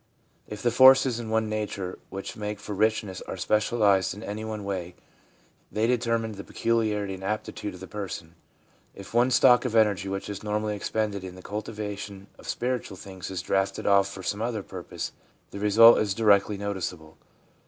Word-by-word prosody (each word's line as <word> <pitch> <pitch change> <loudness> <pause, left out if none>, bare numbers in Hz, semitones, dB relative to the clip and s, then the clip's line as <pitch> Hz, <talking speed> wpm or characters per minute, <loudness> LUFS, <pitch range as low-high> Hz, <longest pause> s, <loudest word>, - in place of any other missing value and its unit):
If 105 -1 -8
the 120 - +3
forces 130 -1 +6
in 115 -2 -6
one's 110 0 +1
nature 100 -4 -3
which 95 0 -6
make 105 -1 -4
for 105 - -6
richness 105 -2 0
are - - -5
specialised 105 -2 +2
in 105 - -9
any 105 +1 -5
one 110 -1 -5
way, 90 -3 -4 0.8
they 110 +1 +1
determine 115 -2 0
the 100 -1 -8
peculiarity 105 -4 0
and 95 0 -8
aptitude 105 -1 -4
of - - -12
the - - -6
person. 90 -4 -6 0.6
If 100 +2 -11
one's 120 +2 +4
stock 125 -2 +6
of 125 -3 -2
energy 105 -3 +3
which 95 0 -4
is 100 -1 -6
normally 105 0 -1
expended 105 -1 -2
in 90 -1 -8
the 95 - -12
cultivation 105 -2 -6
of - - -10
spiritual 125 -6 -2
things 95 -1 -8
is 95 -2 -4
drafted 95 0 0
off 100 -1 +4
for 95 - -8
some 105 +3 -2
other 115 -3 -2
purpose, - - -6 0.4
the 100 - -7
result 110 +3 +7
is 100 -2 0
directly 105 -2 +3
noticeable. 90 -6 -5
105 Hz, 175 wpm, -27 LUFS, 95-110 Hz, 0.8 s, result